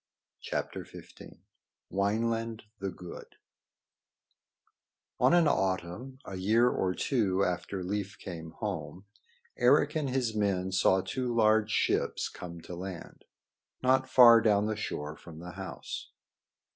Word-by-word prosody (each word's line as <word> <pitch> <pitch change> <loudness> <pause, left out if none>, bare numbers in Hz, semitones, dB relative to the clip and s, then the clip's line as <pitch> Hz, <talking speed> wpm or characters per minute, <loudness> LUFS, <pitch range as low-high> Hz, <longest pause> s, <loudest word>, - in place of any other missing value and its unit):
[Decoration] - - -7 0.5
Wineland 115 +3 -1 0.2
the 100 0 -2
Good 90 -1 -10 1.8
On - - +5
an 170 -3 +5
autumn, 95 +4 -1
a 95 - -6
year 110 +6 +3
or 90 -1 0
two 100 -8 +1
after 90 +1 -3
Leif 100 +1 -3
came 85 -4 -7
home, 95 +4 -5 0.5
Eric - - +4
and 150 -3 0
his 125 -3 0
men 95 -3 0
saw 95 0 +3
two 125 +4 -3
large 110 -1 +4
ships - - 0
come 85 -1 -9
to 90 - -8
land 90 0 -8 0.6
not 130 +1 +3
far 120 -3 +8
down 105 -2 +3
the 110 0 -1
shore 75 -7 -4
from 80 -1 -12
the 90 +2 -8
house. - - -7
100 Hz, 120 wpm, -30 LUFS, 90-115 Hz, 1.8 s, far